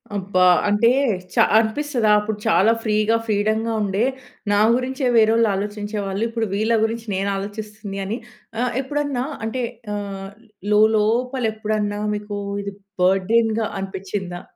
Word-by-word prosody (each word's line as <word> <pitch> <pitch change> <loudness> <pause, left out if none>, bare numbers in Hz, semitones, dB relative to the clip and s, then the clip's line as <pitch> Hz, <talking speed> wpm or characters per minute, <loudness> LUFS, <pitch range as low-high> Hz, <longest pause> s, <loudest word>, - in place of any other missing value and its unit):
అబ్బా! 185 -2 +1 0.2
అంటే 210 +3 +4 0.4
చ - - -12 0.2
అనిపిస్తదా? 230 0 +1
అప్పుడు 210 0 -3
చాలా 190 +7 +4
ఫ్రీగా, 215 +1 +2
ఫ్రీడమ్‌గా 220 +1 0
ఉండే 200 +2 0 0.5
నా 205 - +3 0.2
గురించే 260 +1 -1
వేరోళ్లు 225 +1 +4
ఆలోచించేవాళ్ళు, 205 0 -3
ఇప్పుడు 230 -1 -1
వీళ్ళ 220 +3 +1
గురించి 225 0 -2
నేను 195 +1 -1
ఆలోచిస్తుంది 210 0 -6
అని. 215 +5 -3 0.4
ఆహ్, 245 -2 0
ఎప్పుడన్నా 280 -2 -2 0.2
అంటే 250 +3 -2 0.3
ఆహ్, 195 -1 -5 0.4
లోలోపల 220 +4 +2
ఎప్పుడన్నా 210 -1 -2 0.2
మీకు 205 0 -5 0.3
ఇది 200 0 -5 0.3
బర్డెన్‌గా 215 +4 +2
అనిపిచిందా? 190 -2 -5
215 Hz, 120 wpm, -21 LUFS, 200-230 Hz, 0.5 s, అంటే